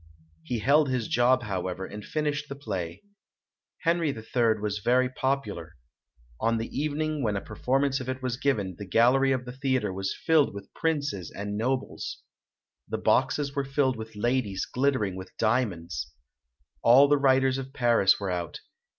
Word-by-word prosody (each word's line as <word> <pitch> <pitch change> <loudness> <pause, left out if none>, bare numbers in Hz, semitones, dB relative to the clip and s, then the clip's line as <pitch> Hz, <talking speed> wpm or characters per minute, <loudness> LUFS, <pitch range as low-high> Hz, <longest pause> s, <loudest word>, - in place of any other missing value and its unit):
He 100 +9 -3
held 140 +5 +3
his 125 -4 -1
job, 125 +1 +3
however, 95 -2 -3
and 105 +2 -8
finished 150 -1 -2
the 140 - -5
play. 95 - -5 0.8
"Henri 165 -1 +2
III" 115 -2 +1
was 105 0 -2
very 125 +4 +2
popular. 130 -11 -2 0.6
On 115 0 +1
the 115 - -5
evening 155 +1 -1
when 105 -5 0
a - - 0
performance 135 +6 0
of 130 0 -6
it 130 0 -3
was 130 -2 -2
given, 105 -9 -1
the 100 - -7
gallery 130 +6 +4
of 130 -1 -1
the 125 - -6
theatre 130 -5 -1
was 95 +1 -3
filled 155 -9 +4
with 100 -1 -10
princes 145 - -1
and 105 +1 -5
nobles. 125 +5 -3 0.6
The - - -2
boxes 140 -2 +1
were 140 - 0
filled 135 -1 +1
with 110 -1 -8
ladies 105 -3 0
glittering 125 -8 0
with 95 - -10
diamonds. 85 - -1 0.7
All 130 +5 +7
the 145 0 +4
writers 135 -1 +3
of 135 0 -7
Paris 120 -7 +3
were 100 -2 -2
out. 85 -2 -4
125 Hz, 160 wpm, -27 LUFS, 105-135 Hz, 0.8 s, All